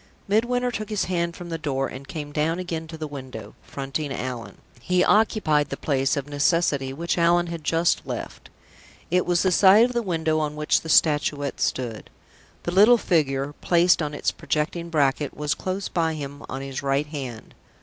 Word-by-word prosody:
Midwinter 245 +4 +1
took 215 -2 -5
his 210 -2 0
hand 170 -2 -1
from 175 -1 -9
the 165 -1 -4
door, 135 -3 -1
and 135 +2 -9
came 150 -3 -6
down 155 +3 0
again 165 -3 -4
to 160 0 -8
the 155 - -4
window, 130 -7 -8
fronting 140 +1 -5
Allan. 120 -6 -5 0.2
He 180 +9 +1
occupied 205 -9 +2
the - - -4
place, 135 -1 0
of 140 0 -3
necessity, 145 -2 +1
which 170 +5 -2
Allan 170 +1 +4
had 170 -2 -6
just 165 +2 +1
left. - - -7 0.6
It 180 0 +2
was 175 -1 +2
the 185 - +2
side 200 +5 +7
of 250 - -3
the 240 - 0
window 160 -5 0
on 150 -1 -2
which 150 0 +1
the 160 - -8
Statuette 145 -2 +2
stood. 120 -4 -2 0.5
The 175 - -2
little 210 +6 +6
figure, 145 -8 0
placed 175 0 +4
on 150 -1 -3
its - - 0
projecting 170 +2 -2
bracket, 145 -2 0
was, 150 0 0
close 190 +1 -4
behind 160 -2 -1
him 140 -1 -7
on 135 - -4
his 135 -1 -5
right 140 +1 0
hand. 135 -7 -7
155 Hz, 185 wpm, -24 LUFS, 140-175 Hz, 0.6 s, side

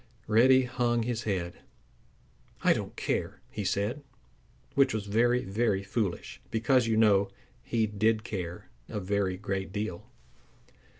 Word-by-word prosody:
Reddy 130 +4 +5
hung 120 -2 0
his 115 -1 -3
head. 90 -4 -2 1.0
"I - - +6
don't - - -5
care!" - - -2
he 105 - -4
said, 105 +9 -1 0.7
which 135 -4 +3
was 105 -2 -2
very, 120 +4 +2
very 100 -1 0
foolish, 100 -2 -3
because, 115 +2 +2
you 110 -1 +2
know, 100 -3 +4 0.3
he 115 -2 0
did 110 +1 +1
care 90 -6 -6 0.2
a 105 - -3
very 95 -1 0
great 95 -1 -3
deal. 105 -4 -4
110 Hz, 130 wpm, -29 LUFS, 100-120 Hz, 1.0 s, I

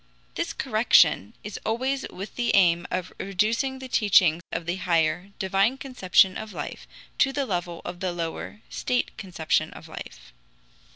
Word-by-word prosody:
This - - -2
correction 100 - +3
is 210 - -6
always 260 +5 -1
with 195 +3 -8
the 240 -1 +1
aim 175 -3 +4
of 185 0 -3
reducing 220 +7 0
the 260 0 -8
teaching 190 -8 +4
of 165 - -3
the 175 +2 -2
higher, 170 +1 +1
divine 195 +6 +1
conception 190 -8 +3
of 220 -1 -7
life - - -6 0.3
to 270 - +4
the 280 0 -1
level 175 -5 -3
of 175 - -6
the 185 -1 -1
lower, 175 +5 -5
state 250 0 -1
conception 180 -6 0
of - - -11
life. - - -10
190 Hz, 155 wpm, -26 LUFS, 175-230 Hz, 0.3 s, aim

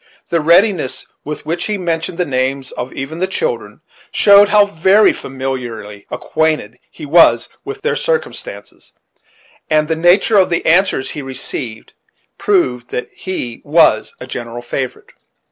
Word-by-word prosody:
The 170 -1 +1
readiness 170 - +2 0.2
with 150 0 -6
which 170 +3 -2
he 210 -1 -2
mentioned 170 -2 -3
the 180 - 0
names 130 -1 -2
of 125 - -6
even 140 +5 -6
the 185 - 0
children, 480 - -3 0.3
showed 200 0 +6
how 210 0 +5
very 200 +3 +4
familiarly 125 -6 -6
acquainted 155 -8 -1
he 155 - -10
was 140 -7 +4
with 415 0 -7
their 470 - 0
circumstances; - - -4 0.8
and 155 -1 +2
the 160 - 0
nature 175 +6 +4
of 185 - +3
the 170 - -1
answers 170 -6 +2
he 150 - -6
received 130 -3 -6 0.5
proved 125 -12 +1
that 125 - -4
he 125 -11 -5
was 145 -8 +3
a - - -7
general 120 -1 -7
favorite. 130 +1 -5
160 Hz, 145 wpm, -16 LUFS, 130-190 Hz, 0.8 s, showed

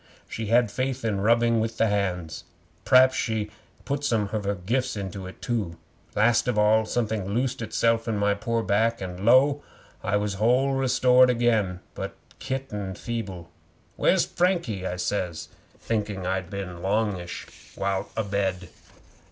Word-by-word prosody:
She 110 -1 -5
had 115 0 +3
faith 130 +1 -2
in 100 -3 0
rubbing 115 +1 +3
with 110 0 -2
the 115 - +3
hands. 95 -6 -2 0.4
P'raps 130 +1 +6
she 110 -4 -2 0.3
put 140 +1 -2
some 110 -7 +1
of 105 -2 -2
her 100 +1 0
gifts 120 +7 -1
into 95 -1 -5
it, 95 - -12
too. 105 -9 -2 0.4
Last 115 +4 +3
of 125 -3 0
all, 110 +1 +4
something 110 -5 -1
loosed 125 0 -1
itself 115 +1 +1
in 110 -2 0
my 100 0 +2
pore 115 +3 -1
back, 110 +4 +1
and 90 0 -6
lo! 135 +5 +5 0.4
I 100 +1 +1
was 105 0 -1
whole 130 +4 +3
restored 130 -1 +4
again, 110 -7 +1
but - - -6 0.2
kitten 115 -8 -4
feeble. 95 -7 -5 0.4
'"Where's - - +3
Frankie?" 170 - 0
I 90 - -3
says, 90 -2 -3 0.3
thinking 105 -4 -3
I'd 95 -1 -2
been 100 -1 -5
a 85 -1 -9
longish 95 -2 -2 0.3
while 95 -1 -2
abed. 95 -4 -1
110 Hz, 150 wpm, -26 LUFS, 95-120 Hz, 0.4 s, P'raps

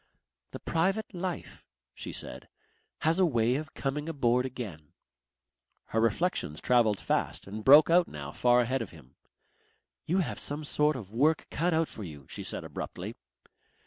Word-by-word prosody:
"The - - -8
private 190 +7 0
life," 180 0 -5 0.3
she - - -6
said, - - -6 0.5
"has 165 +3 +2
a - - +5
way 120 -4 +2
of 155 +3 -4
coming 145 +3 -2
aboard 125 -4 +2
again." 100 - -8 1.0
Her 110 - +1
reflections 115 - 0
travelled 115 -5 +3
fast - - -1
and 105 +3 -6
broke 145 +6 +8
out 175 0 +5
now 70 -1 -7
far 120 +6 +4
ahead 130 +2 0
of - - -5
him. 75 -7 -16 0.9
"You 180 - +2
have 130 - -1
some 145 +2 -3
sort 150 +1 +2
of 105 -5 -8
work 150 +7 +3
cut 170 +1 +1
out 160 0 +2
for 110 - -8
you," 75 -6 -9
she - - -6
said - - -4
abruptly. - - -6
130 Hz, 160 wpm, -29 LUFS, 110-160 Hz, 1.0 s, broke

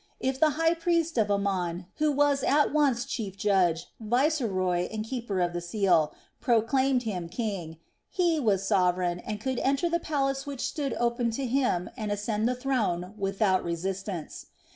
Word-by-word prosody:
If 265 0 -1
the 315 - +5
high 330 0 +3
priest 335 -4 0
of 210 -2 +2
Amon, 185 -3 -1
who 305 0 +2
was 285 -1 +2
at 290 +1 +3
once 275 -6 +2
chief 200 -5 -4
judge, 185 -5 +2
viceroy 215 - +1
and 215 -1 -4
keeper 230 -5 -3
of 175 0 0
the 175 - -3
seal, 175 -3 +2 0.3
proclaimed 255 +2 +2
him 180 -7 -4
king, 185 -8 -4 0.3
he 345 -4 +1
was 200 -7 +1
sovereign 180 -3 +1
and 210 +3 -5
could 260 +2 -2
enter 275 +5 +1
the 340 - +2
palace 275 -3 -1
which 275 -3 -5
stood 280 -5 -2
open 235 0 0
to 275 - -2
him 245 -8 +1
and 215 -4 -4
ascend 210 +2 -1
the 250 - 0
throne 215 -9 -1
without 195 -1 +1
resistance. 185 0 -4
220 Hz, 165 wpm, -28 LUFS, 185-270 Hz, 0.3 s, the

